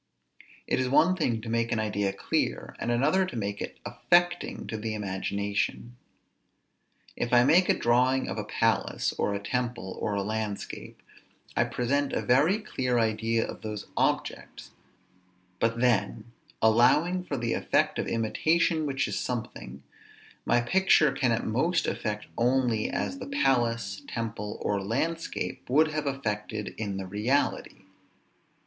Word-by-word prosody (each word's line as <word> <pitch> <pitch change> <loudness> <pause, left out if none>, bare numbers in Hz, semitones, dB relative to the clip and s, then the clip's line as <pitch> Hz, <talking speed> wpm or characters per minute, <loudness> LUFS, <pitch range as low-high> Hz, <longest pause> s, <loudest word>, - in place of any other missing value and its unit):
It - - 0
is 130 -1 0
one 155 +7 +4
thing 120 -10 0
to 115 - -9
make 115 0 0
an 115 - +1
idea 105 -2 0
clear, - - -2
and - - -2
another 140 +11 +3
to 185 - -5
make 100 -2 -3
it - - -5
affecting 175 0 +1
to - - -5
the 110 0 -3
imagination. 100 +3 -2 1.2
If 120 - -2
I 120 -1 +6
make 170 +8 +4
a - - +4
drawing 125 +2 +2
of 100 +3 -4
a - - -2
palace, 110 +2 0
or 100 - +1
a - - -2
temple, 120 -3 -3
or 105 - -1
a 100 - 0
landscape, 110 -1 -5 0.5
I - - +3
present 140 +3 -1
a - - -1
very 145 +11 +4
clear 130 - -1
idea 115 0 +1
of - - -8
those 105 -1 -5
objects; - - -2 0.9
but 115 0 +1
then 120 -2 +1 0.3
(allowing 150 +11 +4
for 145 -6 -4
the 120 -1 -1
effect - - +1
of - - -2
imitation 155 +8 +1
which 135 -1 0
is - - -2
something) 70 - -5 0.6
my 120 - +4
picture 155 +1 +4
can 125 -2 +1
at 115 - 0
most 165 +10 +1
affect 105 -1 -3
only 120 -2 +2
as 275 - -3
the - - -6
palace, 115 - +1
temple, 110 -2 -4
or 100 -1 0
landscape, 150 +13 -3
would 155 +4 +4
have 155 -1 -3
affected 105 -5 -3
in 100 -3 -3
the 95 - -4
reality. 105 +4 -1
120 Hz, 150 wpm, -28 LUFS, 105-140 Hz, 1.2 s, I